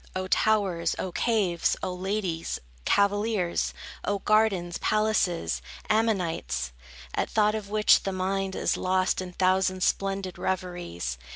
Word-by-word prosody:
O 185 0 -1
towers, 195 -3 +2
O 185 - -3
caves, 195 -6 +1
O 185 - -1
ladies, 185 -3 -2 0.3
cavaliers, 200 -2 +1 0.3
O 205 - 0
gardens, 195 -5 +2
palaces! 185 - +1 0.3
Amenites, 170 - 0 0.4
At - - -1
thought 210 -1 +3
of 215 -2 -4
which, 210 0 +5
the 195 - -2
mind 190 +1 -1
Is - - +1
lost 185 0 +1
in 185 -1 -6
thousand 185 0 +2
splendid 195 -2 -1
reveries! 175 - -3
190 Hz, 120 wpm, -27 LUFS, 175-210 Hz, 0.4 s, which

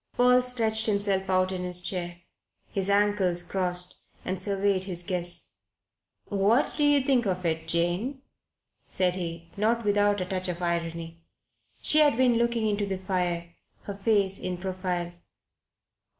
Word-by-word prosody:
Paul 250 0 +5
stretched 225 -3 +1
himself 200 -2 0
out 185 0 +2
in 185 -1 -3
his 180 0 +3
chair, 175 -1 -4 0.5
his 195 0 -1
ankles 200 -4 +2
crossed, 180 0 -2 0.3
and 185 -1 -2
surveyed 195 -1 +1
his 175 -2 0
guests. 175 -1 -2 0.7
"What 205 +6 +2
do 295 - 0
you 290 -1 +4
think 260 -5 +2
of 180 -1 -2
it, 160 -1 -1
Jane?" 175 - -1 0.6
said 180 -1 0
he, 170 -2 -6
not 225 +2 +1
without 205 0 +2
a 185 - -2
touch 185 0 -2
of 175 -1 -4
irony. 170 -1 -3 0.6
She 305 - +4
had 290 -6 +4
been 250 -2 +3
looking 235 -1 +1
into 205 -1 0
the 190 -1 -2
fire, 180 -3 -2 0.3
her 200 - -5
face 195 -1 +1
in 180 -1 -4
profile. 180 -1 -3
190 Hz, 150 wpm, -27 LUFS, 175-210 Hz, 0.7 s, Paul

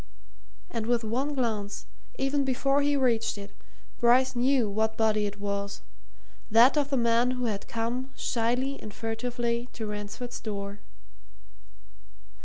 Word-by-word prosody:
And 225 -2 -3
with 240 -1 +2
one 260 +7 -1
glance, 215 -5 -2 0.3
even 275 +1 +1
before 275 +2 +2
he 290 0 +2
reached 235 -5 +1
it, 200 0 -8 0.5
Bryce 250 +2 +4
knew 250 -1 +3
what 220 +2 0
body 215 -2 +2
it 205 0 -7
was 200 - -3 0.7
that 235 +6 +7
of 290 -2 +1
the 275 - +1
man 235 +1 +3
who 250 -1 -1
had 205 -3 -3
come, 235 +3 -2
shyly 250 +4 0
and 215 - -7
furtively, 235 +2 -2
to 225 - -5
Ransford's 210 +4 -5
door. 200 -1 -5
235 Hz, 135 wpm, -28 LUFS, 215-255 Hz, 0.7 s, that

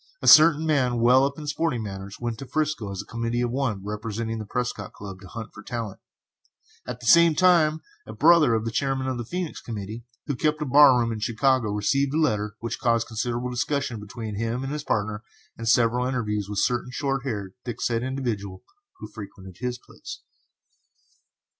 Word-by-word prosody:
A - - -4
certain 155 0 +8
man 130 -6 +1
well 125 +3 +5
up 140 0 -3
in 155 - -7
sporting 145 -5 -1
matters 95 -1 -7
went 120 -2 -4
to 135 - -8
'Frisco 150 -6 -1
as 95 - -5
a - - -23
committee 115 +1 -2
of 120 -1 0
one, 115 -7 -2
representing 110 +2 -4
the 110 - -7
Prescott 120 -4 -3
Club, 95 -2 -9
to 95 - -11
hunt 115 +2 -8
for 100 - -11
talent; 110 -2 -5 0.9
at 125 0 -6
the - - -9
same 170 +4 +6
time 165 -3 +4 0.3
a - - -7
brother 160 -7 +5
of 110 0 -1
the 115 - -2
chairman 135 +2 -1
of 130 -2 -2
the - - -3
Phœnix 175 +6 -5
committee, 110 0 -6 0.2
who 145 - -2
kept 155 +4 0
a 150 - -2
bar 140 -1 +7
room 115 -1 0
in 110 - -4
Chicago, 120 +1 +1
received 135 +7 +1
a - - +2
letter 105 -9 0
which 115 - -4
caused 115 -2 +2
considerable 120 +2 -3
discussion 130 -1 -2
between 105 0 -7
him 115 +3 -2
and 135 +2 -4
his 150 -1 -4
partner, 105 -5 -1 0.3
and 115 -1 -3
several 120 +1 +3
interviews 105 -6 -2
with 105 - -4
a - - +3
certain 125 0 0
short 135 +1 -2
haired, 100 -8 -4
thick 120 -2 -6
set 115 -1 0
individual 120 -8 -4 0.3
who - - -8
frequented 95 -4 -11
his 125 -1 -3
place. - - -11
120 Hz, 195 wpm, -25 LUFS, 110-135 Hz, 0.9 s, certain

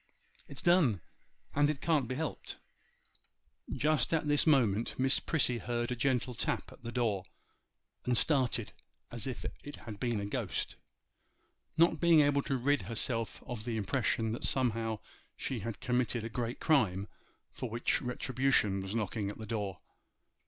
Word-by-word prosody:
it's 140 - -7
done, 165 - +4 0.5
and 145 0 +2
can't 150 -6 +2
be 130 - -3
helped.' 155 0 -4 1.1
Just 150 +3 +2
at 155 -1 -1
this 145 +2 +3
moment 120 -7 +3
Miss 130 +1 +3
Prissy 125 -6 +1
heard 120 0 -2
a - - 0
gentle 125 -2 +1
tap 115 - -2
at - - -15
the 120 0 -6
door, 110 -6 0 0.8
and 125 -1 +2
started 130 -7 +2 0.4
as 120 +1 -3
if 130 - -5 0.2
it 145 - -7
had 105 -3 -9
been 120 -2 0
a 100 - -3
ghost—not 165 +9 -3
being 170 -2 +6
able 145 -1 +3
to 135 -1 -1
rid 145 +3 +2
herself 115 0 -1
of 120 -4 -5
the 115 -1 -2
impression 110 +1 0
that 115 - -4
somehow 115 -4 0 0.4
she 130 - -3
had 110 +1 -5
committed 125 -2 0
a 115 - -4
great 120 +1 -3
crime, 105 - +2 0.4
for 125 - -5
which 115 +2 0
retribution 125 -5 +1
was 95 +3 -4
knocking 105 -2 -1
at 105 - -7
the 110 - -7
door. 105 -4 -3
120 Hz, 150 wpm, -32 LUFS, 110-135 Hz, 1.1 s, being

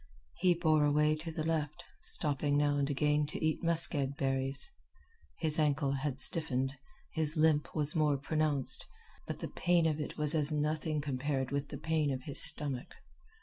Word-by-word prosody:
He 180 -1 +3
bore 155 -3 +2
away 150 +1 +2
to 165 +1 -6
the 155 -1 -4
left, 155 -2 -2 0.2
stopping 145 0 0
now 145 0 +2
and 140 0 0
again 150 +1 +1
to 155 - -4
eat 155 - 0
muskeg 160 -5 +2
berries. 135 0 -1 0.7
His 155 -1 -1
ankle 145 -2 +1
had 135 0 -3
stiffened, 135 -3 +4 0.4
his 160 -1 -1
limp 155 -1 +2
was 150 0 0
more 150 -3 +2
pronounced, 150 -1 -1 0.4
but - - -6
the - - -3
pain 175 -1 +1
of 155 -1 0
it 150 - -5
was 150 0 0
as 155 -1 +1
nothing 150 0 -1
compared 135 -1 -2
with 140 0 -2
the 145 - -6
pain 155 -1 0
of 130 -1 -4
his 145 - +2
stomach. 140 -4 +1
150 Hz, 170 wpm, -32 LUFS, 140-155 Hz, 0.7 s, stiffened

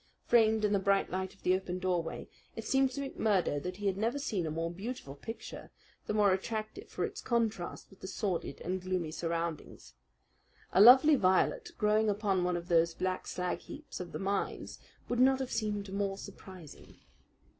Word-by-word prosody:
Framed 220 -2 +4
in 210 - +1
the 200 - +3
bright 195 0 +2
light 190 +1 -3
of - - -27
the 180 - +3
open 185 -1 -2
doorway, 180 -3 -2 0.3
it 225 - -6
seemed 270 0 +3
to 280 +1 -4
McMurdo 190 - +1
that 180 +3 -5
he 205 - -6
had 195 -1 +1
never 230 +6 0
seen 215 - -2
a - - -2
more 165 +2 -2
beautiful 195 - -6
picture; 225 +11 -8 0.4
the - - -1
more 205 -3 +5
attractive 215 +3 -4
for - - -2
its 420 0 -6
contrast 225 -7 -2
with 195 - -17
the - - -7
sordid 190 -2 -3
and 185 +2 -2
gloomy 185 -3 -2
surroundings. 165 0 -4 0.8
A 190 - +6
lovely 260 +7 +9
violet 190 -8 +2
growing 215 +1 +3
upon 200 -3 +1
one 180 0 +1
of 170 0 -7
those 170 -1 +3
black 185 0 -2
slag 180 0 -2
heaps 300 +1 -9
of 180 -1 -6
the - - -4
mines 195 0 -3 0.3
would 245 - -1
not 265 +1 +5
have 260 -1 -4
seemed 205 -3 -2
more 195 -1 -1
surprising. 185 -5 -12
195 Hz, 185 wpm, -32 LUFS, 180-220 Hz, 0.8 s, lovely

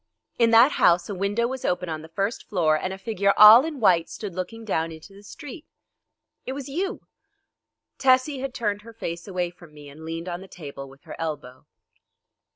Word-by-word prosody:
In 230 -1 +5
that 230 +5 +6
house 175 -6 +3
a - - -3
window 200 +5 -1
was 260 +1 -4
open 180 0 -1
on 160 -1 -4
the 160 - -11
first 195 +7 -3
floor, 165 -6 +2
and 185 +4 -3
a 190 - -6
figure 200 -1 0
all 215 +4 +10
in 310 -3 -5
white 175 -7 +3
stood 205 -4 -7
looking 185 +6 -6
down 165 -5 -1
into 160 +5 -12
the 200 - -15
street. 290 +8 -11 0.8
It 260 - -5
was 275 0 -7
you." 370 +9 -4 0.9
Tessie 260 +1 +3
had 270 0 -4
turned 210 -5 -2
her 230 +2 -13
face 170 -5 -6
away 180 -2 -2
from 175 -3 -17
me 145 -1 -12
and 150 +3 -13
leaned 165 +2 -6
on 175 0 -5
the 190 - -11
table 140 -6 -9
with 135 +1 -18
her - - -9
elbow. 145 -5 -6
195 Hz, 200 wpm, -24 LUFS, 165-230 Hz, 0.9 s, all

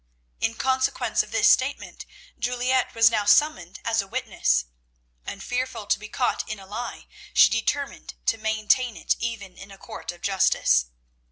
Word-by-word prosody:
In 230 - 0
consequence 260 +2 +1
of - - -9
this - - +3
statement - - +1 0.3
Juliette 250 +1 0
was 225 0 +6
now 210 - +1
summoned 205 - +3
as 225 -2 +2
a 195 - -10
witness, 60 - 0 0.6
and, 195 - -6
fearful 250 -3 -3
to - - +1
be 215 0 -10
caught 255 +1 0
in 215 - -4
a 195 - -12
lie, 220 +5 -6 0.3
she - - +7
determined 275 +5 -2
to 225 - +1
maintain 220 +2 +1
it - - 0
even 215 -5 -5
in 195 - -12
a 195 - -12
court - - -7
of 175 0 -16
justice. 125 - +2
225 Hz, 165 wpm, -25 LUFS, 200-245 Hz, 0.6 s, she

